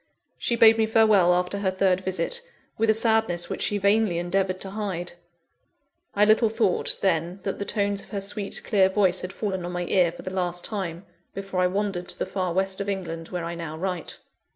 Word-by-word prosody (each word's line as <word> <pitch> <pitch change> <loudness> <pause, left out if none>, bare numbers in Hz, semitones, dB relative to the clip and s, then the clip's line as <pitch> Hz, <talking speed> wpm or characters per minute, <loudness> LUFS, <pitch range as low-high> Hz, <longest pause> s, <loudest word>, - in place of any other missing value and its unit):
She 235 - 0
bade 225 -1 +6
me 220 - +3
farewell 215 -5 +5
after 180 +3 0
her 195 -2 +1
third 190 0 +1
visit, 190 - -2 0.3
with 225 0 +1
a - - +6
sadness 220 -6 +1
which - - -4
she 205 - +1
vainly 200 -2 +2
endeavoured 185 +2 -1
to 195 - -5
hide. 190 -4 -4 1.0
I 205 +1 +5
little 220 +1 +4
thought, 220 -4 +1
then, 175 0 0
that 195 - -3
the 200 - -3
tones 200 -2 -1
of - - -15
her 200 -2 -3
sweet, 200 0 -3
clear 195 -4 +3
voice 190 -2 +2
had 185 - -5
fallen 190 -3 -3
on 175 - -4
my 175 0 -2
ear 175 -2 +3
for - - -11
the 185 - -6
last 180 -1 -2
time, 185 -4 -4 0.3
before 195 -1 -4
I 180 - +4
wandered 195 -2 -2
to - - -4
the - - -2
far 185 -2 -2
West 190 +2 0
of 200 - -3
England 165 -4 -4
where 175 -2 -4
I 170 - -4
now 165 -2 -6
write. 180 -1 -4
190 Hz, 210 wpm, -25 LUFS, 180-205 Hz, 1.0 s, bade